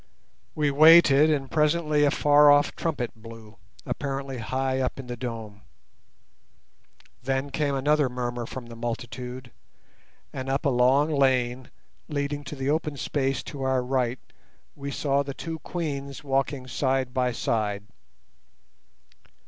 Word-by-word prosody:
We 150 -2 +1
waited, 155 0 +7
and 140 -3 -1
presently 150 -1 +2
a - - +4
far 145 +1 +5
off 145 0 +4
trumpet 145 -8 -2
blew, 115 -1 -13 0.3
apparently 135 -2 -4
high 130 +3 -1
up 130 +1 -2
in 135 - -7
the 120 0 -5
dome. 115 -4 -7 1.6
Then 135 +2 -2
came 140 -1 0
another 145 0 +2
murmur 120 -1 -4
from 130 -2 -7
the 120 0 -10
multitude, 120 +2 -6 0.8
and 130 0 -5
up 135 +1 -1
a - - +4
long 130 +4 +3
lane, 130 -3 +1 0.4
leading 145 -1 -3
to 140 - -6
the 135 +1 -1
open 150 -2 -1
space 135 -1 -1
to 140 - -8
our 130 -1 +1
right, 125 -1 0 0.6
we 140 0 -6
saw 140 0 0
the 140 -1 -6
two 165 -1 -6
Queens 140 -5 -5
walking 135 -1 -1
side 130 0 -1
by 125 -1 +1
side. 105 -3 -1
135 Hz, 135 wpm, -26 LUFS, 125-145 Hz, 1.6 s, waited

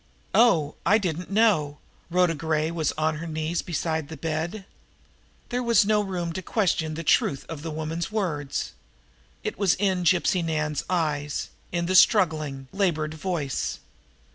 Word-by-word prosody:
"Oh, 170 -10 +4
I 200 +5 +5
didn't 180 -4 -3
know!" 195 -9 +2 0.3
Rhoda 180 -1 +3
Gray 155 0 -1
was 165 -2 0
on 155 0 0
her 165 +2 -6
knees 160 +1 -2
beside 160 -2 -2
the 160 - -7
bed. 165 +5 -3 0.8
There 245 +1 -1
was 235 -4 +4
no 210 0 +3
room 180 -4 -3
to 190 - -4
question 165 -5 0
the 165 - -5
truth 140 -2 +2
of 160 -3 -7
the 165 - -5
woman's 160 +3 -3
words, 165 -10 -2 0.7
it - - -4
was 195 -4 +3
in 190 -2 0
Gypsy 175 +1 +3
Nan's 155 -2 -1
eyes, 150 -5 -1 0.2
in 170 -1 -1
the 185 - 0
struggling, 155 - +3
labored 165 -6 0
voice. 160 -4 -2
165 Hz, 150 wpm, -25 LUFS, 155-185 Hz, 0.8 s, I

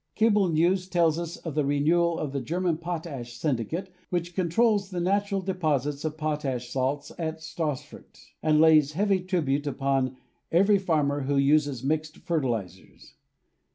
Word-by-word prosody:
Cable 210 -4 +3
news 180 +4 +2
tells 170 -3 +2
us 170 0 -5
of 165 - -6
the 150 0 +1
renewal 165 +4 +2
of 145 - -3
the 140 -1 -2
German 175 +1 -1
potash 155 -8 -6
syndicate 155 - -2 0.2
which 175 -1 -2
con 180 -3 0
trols 205 +1 +2
the 180 -2 -4
natural 200 +2 0
deposits 150 -7 -1
of 155 -1 -3
potash 145 -6 -2
salts 135 +3 -2
at 160 -1 -2
Stassfurt 160 -3 -6 0.2
and 155 -1 +3
lays 155 -2 +5
heavy 195 +3 +2
tribute 155 -6 -1
upon 135 -2 0 0.3
every 195 +4 +4
farmer 150 -6 +1
who 140 +1 +1
uses 140 -2 +2
mixed 155 +2 -1
fertilizers. 115 - -4
155 Hz, 150 wpm, -27 LUFS, 140-175 Hz, 0.3 s, lays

